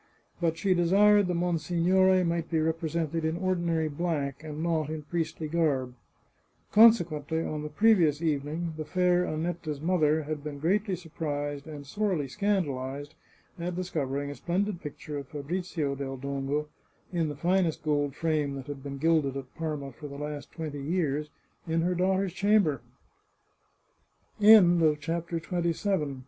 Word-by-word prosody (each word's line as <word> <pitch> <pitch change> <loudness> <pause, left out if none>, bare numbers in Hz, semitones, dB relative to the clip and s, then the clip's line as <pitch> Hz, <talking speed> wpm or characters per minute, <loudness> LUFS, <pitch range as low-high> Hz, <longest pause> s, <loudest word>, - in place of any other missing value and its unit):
But 165 -2 0
she 190 +2 +2
desired 200 +3 +5
the 180 - -1
monsignore 180 +2 +2
might 170 -1 -1
be 165 - +1
represented 160 0 -1
in 160 +1 0
ordinary 170 -3 0
black, 145 -2 -2
and 155 0 -5
not 160 -3 0
in 155 -1 -5
priestly 160 0 -3
garb. 145 -6 0 0.8
Consequently, 170 -8 +4
on 155 -1 -3
the 150 - -5
previous 170 -4 +4
evening, 160 +1 -2
the 155 - -3
fair 180 +2 +2
Annetta's 155 -2 -3
mother 155 -2 +2
had 150 -1 -5
been 150 -1 -5
greatly 190 +6 +1
surprised 145 -4 -4
and 145 -2 -8
sorely 185 -3 -1
scandalized 145 -6 -2 0.5
at 175 +1 -3
discovering 145 -6 -2
a - - -7
splendid 180 - -2
picture 150 0 -6
of 140 - -9
Fabrizio 155 0 -3
del 135 -1 -5
Dongo, 140 +2 -2 0.4
in 165 -3 0
the 145 - -5
finest 175 +1 +1
gold 145 -2 0
frame 150 -4 0
that 135 -2 -7
had 145 -1 -7
been 140 0 -6
gilded 150 -3 +2
at 130 -2 -8
Parma 150 -4 -4
for 145 +4 -9
the 140 - -9
last 150 0 -6
twenty 150 -4 -5
yea 150 -1 0
155 Hz, 130 wpm, -28 LUFS, 145-175 Hz, 0.8 s, desired